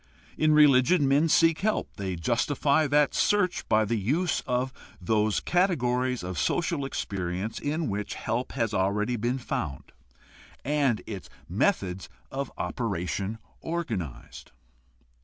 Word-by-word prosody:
In 155 0 +3
religion 145 +1 +5
men 145 +4 +3
seek 165 0 +4
help; 215 +3 -1
they 95 -2 -3
justify 140 - +1
that 145 0 +3
search 200 -4 +1
by 110 0 +4
the 115 +1 0
use 155 - 0
of 125 +1 0 0.3
those 105 +3 +1
cate 180 0 +2
gories 125 -2 0
of 90 -1 -4
social 170 -5 0
experience 95 -4 -3
in 155 +2 -2
which 105 0 -3
help 115 +4 -3
has 115 -5 -1
already 105 +5 +1
been 120 +3 -1
found 75 - -4 0.7
and 140 -5 +1
its 100 -5 -7 0.2
methods 95 -1 0 0.2
of 140 0 -4
operation 100 -1 -2 0.2
organized. 110 - -5
125 Hz, 125 wpm, -27 LUFS, 100-150 Hz, 0.7 s, religion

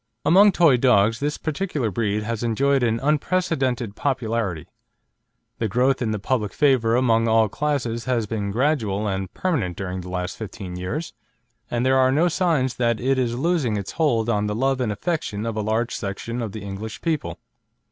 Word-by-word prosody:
Among 195 +7 +6
toy 165 -8 +4
dogs 115 -3 +3
this 145 +1 -1
particular 155 - -2
breed 105 +1 -1
has 115 0 -3
enjoyed 135 +4 +2
an 115 -1 +1
unprecedented 140 - 0
popularity; 115 - -2 0.9
the 115 - 0
growth 125 +6 +1
in 115 - 0
the 110 - -1
public 105 0 -1
favour 130 -6 +3
among 115 -2 +3
all 110 -1 +4
classes 125 -2 -2
has 120 -4 0
been 105 -1 -3
gradual 110 -4 0
and 95 -1 -3
permanent 125 - -1
during 95 -1 -4
the 90 - -9
last 90 +2 -4
fifteen 100 -4 -7
years, 95 - -4 0.6
and 120 +1 -1
there 130 0 +4
are 130 0 +4
no 160 +6 +3
signs 160 -8 0
that 115 -2 +1
it 130 +1 +1
is 120 -2 -1
losing 140 -7 +1
its 100 -2 -5
hold 120 -9 +1
on 105 -3 +1
the 105 - -2
love 135 +2 +1
and 115 -4 0
affection 110 - -3
of 115 -1 -3
a 110 - -1
large 110 +3 -1
section 115 +5 -4
of 110 -3 -4
the 105 0 -7
English 100 +2 -6
people. 160 -3 -2
115 Hz, 180 wpm, -23 LUFS, 105-135 Hz, 0.9 s, Among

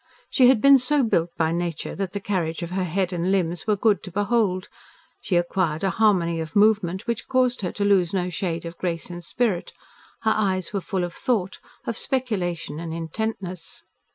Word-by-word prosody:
She 255 -3 +6
had 250 -4 +5
been 275 -1 +8
so 280 +3 +2
built 175 -7 +1
by 160 -1 +1
nature 170 -2 -3
that 190 -2 -4
the 200 - -2
carriage 180 -4 -2
of 170 - -5
her 185 0 -1
head 185 +2 -1
and 175 +2 0
limbs 175 -1 0
was 210 -1 +2
good 215 -2 +3
to 185 - -9
behold. 205 -1 +1 0.5
She 185 - -1
acquired 175 -2 0
a 195 - +2
harmony 185 -7 +2
of 160 -1 -6
movement 205 -3 +3
which 235 -2 -3
caused 255 -2 +2
her 180 - -2
to 200 - -1
lose 190 -4 +3
no 180 -2 -1
shade 170 -2 -3
of 170 0 -8
grace 170 -1 -3
and 175 0 -7
spirit. 210 -2 -1 0.5
Her 220 0 +3
eyes 190 -3 0
were 200 - -1
full 185 0 -2
of 175 -1 -4
thought, 205 -6 -1 0.3
of 230 - -2
speculation, 185 - -2
and 165 -1 -5
intentness. 180 +1 -5
185 Hz, 195 wpm, -24 LUFS, 170-215 Hz, 0.5 s, been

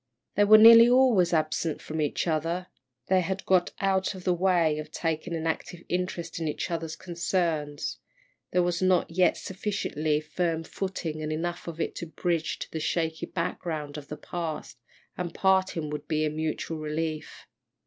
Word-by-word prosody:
They 205 - +4
were 215 +1 +9
nearly 230 +2 +10
always 245 -8 +4
absent 155 -1 0
from 155 0 -4
each 150 - -1
other, 165 +2 -1 0.4
they 185 0 +3
had 190 +2 -3
got 185 -2 +3
out 190 0 +1
of 185 - -9
the 180 - +2
way 175 -4 +2
of 155 0 -7
taking 165 +1 -2
an 160 0 -3
active 165 +1 -3
interest 175 -2 -3
in 165 - -2
each 150 - -3
other's 165 -1 -3
concerns 170 -4 -2 0.5
there 180 0 +2
was 175 0 -1
not 185 -3 +2
yet 180 +2 +3
sufficiently 185 -6 -2
firm 165 +1 -2
footing 165 -4 -4
and 155 0 -3
enough 170 +3 -3
of 165 -1 -6
it - - -1
to 170 - -5
bridge 165 0 -1
to - - -7
the 160 - -3
shaky 160 0 -1
background 160 -4 -3
of 145 -2 -8
the 150 - -6
past, 160 -6 -5 0.4
and 175 -2 -4
parting 190 -5 +1
would 150 - -5
be 155 0 +1
a 150 - -1
mutual 155 +1 -3
relief. 155 0 -4
170 Hz, 170 wpm, -27 LUFS, 155-185 Hz, 0.5 s, nearly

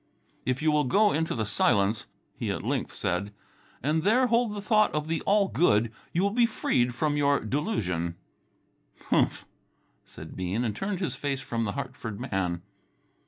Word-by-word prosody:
"If 130 +3 0
you 155 - +4
will 150 -1 +2
go 205 +11 +4
into 160 +1 0
the 110 -2 -1
silence," 100 +1 +2 0.3
he - - -3
at - - -2
length - - -1
said, 95 +2 -2 0.5
"and 155 +3 +1
there 225 +8 +4
hold 235 -2 +2
the - - -4
thought 215 0 +3
of 150 0 -1
the 160 -1 -1
all 200 0 +4
good, 115 - +2 0.2
you 175 - +1
will 200 - +2
be 235 +2 +4
freed 120 - 0
from 150 +2 0
your 140 -1 +3
delusion." 100 - -2 1.0
"Humph!" - - +2 0.6
said - - -11
Bean 95 +6 -1
and 110 -4 -2
turned 195 - -3
his 160 -10 -1
face 135 0 -2
from 115 -3 -2
the 100 - -2
Hartford 130 -6 -5
man. 90 -8 -2
140 Hz, 170 wpm, -27 LUFS, -, 1.0 s, you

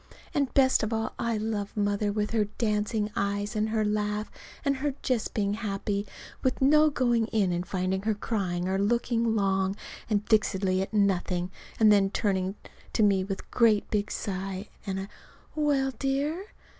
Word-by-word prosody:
And 280 -5 +1
best 260 -1 +5
of 215 - -1
all 225 0 -1
I 230 -1 0
love 210 -1 -3
Mother 205 0 +1
with 210 0 -1
her 220 -2 +2
dancing 210 0 -1
eyes 205 +2 -1
and 215 +1 +1
her 215 -1 +1
laugh, 210 0 -1 0.3
and 280 -1 +2
her 280 0 -1
just 250 -4 -1
being 200 -2 +1
happy, 205 -1 -2 0.3
with 260 - 0
no 300 +3 +5
going 240 -5 +1
in 205 -5 +1
and 175 0 -1
finding 190 0 -1
her 215 +1 0
crying 185 -5 -2
or 190 +1 0
looking 230 +1 +1
long 195 -1 +1 0.3
and 210 -1 0
fixedly 190 -3 +2
at 195 - -3
nothing, 185 -3 +1 0.3
and 215 -1 +7
then 200 -2 +4
turning 190 -1 0 0.4
to 220 - +3
me 195 -2 +4
with 195 0 -4
a - - -27
great 220 -3 +3
big 205 -1 0
sigh, 195 0 -4 0.2
and 190 0 -2
a 195 - -6 0.5
"Well, 285 -3 +2
dear?" 285 +7 -1
210 Hz, 170 wpm, -28 LUFS, 195-230 Hz, 0.5 s, and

